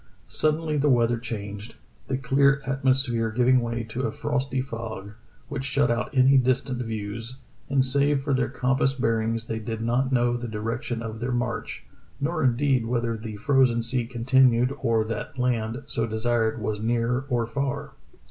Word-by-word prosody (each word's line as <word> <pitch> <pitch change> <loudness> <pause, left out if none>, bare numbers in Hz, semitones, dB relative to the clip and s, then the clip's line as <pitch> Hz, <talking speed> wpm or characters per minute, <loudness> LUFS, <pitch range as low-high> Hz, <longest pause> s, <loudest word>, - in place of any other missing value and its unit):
Suddenly 155 0 0
the 145 +1 +2
weather 120 -2 +3
changed, 105 -2 -6 0.3
the 130 - -1
clear 135 +1 +3
atmosphere 130 -4 +1
giving 125 +3 +3
way 115 0 -2
to 115 +3 -5
a - - -3
frosty 135 -1 -2
fog, 115 -5 -5 0.4
which 145 -2 -4
shut 140 -1 +1
out 120 +1 -1
any 135 -1 +5
distant 130 0 0
views, 115 +2 -5 0.3
and 135 -1 +3
save 140 +1 +2
for 140 -1 0
their 130 -1 +1
compass 135 +1 +1
bearings 115 -2 0
they 110 -1 -3
did 110 0 -4
not 125 +3 +1
know 120 -1 +2
the 120 0 -5
direction 115 +2 -3
of 110 -1 -6
their 125 +2 -2
march, 120 0 -3 0.3
nor 160 +2 -1
indeed 130 -1 +2
whether 115 -1 0
the 110 -1 -7
frozen 125 0 +3
sea 120 0 0
continued 125 +1 +3
or 115 -3 +2
that 115 +4 -5
land, 120 0 -1
so 115 0 -2
desired, 110 0 0
was 105 0 -2
near 120 +3 0
or 120 -2 +1
far. 140 +4 -3
120 Hz, 165 wpm, -25 LUFS, 115-135 Hz, 0.4 s, any